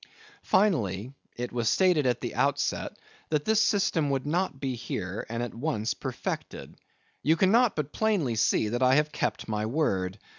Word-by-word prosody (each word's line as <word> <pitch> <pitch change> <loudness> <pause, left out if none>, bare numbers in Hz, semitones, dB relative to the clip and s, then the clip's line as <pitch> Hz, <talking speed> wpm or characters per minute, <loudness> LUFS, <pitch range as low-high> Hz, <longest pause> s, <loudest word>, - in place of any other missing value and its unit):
Finally: 125 - +1 0.2
It 125 0 -4
was 120 -2 0
stated 180 -7 +3
at 120 -1 0
the 120 - -4
outset, 140 +3 0 0.3
that 150 -2 0
this 220 0 +3
system 175 -8 +2
would 135 -1 -1
not 165 -2 -1
be 135 -2 -2
here, 105 -4 -5
and 115 +1 -2
at 120 - -5
once, 115 -4 -1
perfected. - - -5 0.5
You 160 +3 +3
cannot 215 +7 +4
but 150 -1 -3
plainly 200 - +1
see 110 -1 +2
that 120 +3 -2
I 130 +1 +5
have 150 +1 +2
kept - - -2
my 105 -1 -1
word. 95 -9 0
135 Hz, 170 wpm, -28 LUFS, 115-160 Hz, 0.5 s, I